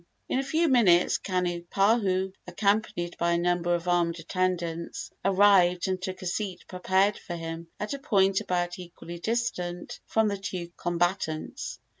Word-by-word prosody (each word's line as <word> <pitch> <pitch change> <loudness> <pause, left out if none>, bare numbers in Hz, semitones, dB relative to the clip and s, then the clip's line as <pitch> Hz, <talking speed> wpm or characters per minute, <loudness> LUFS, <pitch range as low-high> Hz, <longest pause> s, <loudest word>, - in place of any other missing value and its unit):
In 260 - 0
a - - 0
few 320 +5 +1
minutes 200 - +4
Kanipahu, 185 +2 +1
accompanied 200 -1 0
by 170 0 +2
a - - +2
number 175 0 +1
of 170 +1 -5
armed 170 -1 +2
attendants, 170 -1 -2
arrived 190 -2 +4
and 185 -1 -1
took 185 0 -5
a - - -6
seat 185 0 -3
prepared 190 +2 +1
for 175 - -6
him 165 0 -6
at 210 - -3
a 280 - -4
point 195 -8 +2
about 175 0 -2
equally 175 -1 -9
distant 180 -5 -2
from 220 -1 +2
the 200 -1 -2
two 180 -3 -5
combatants. 175 -2 -2
180 Hz, 150 wpm, -27 LUFS, 175-200 Hz, -, minutes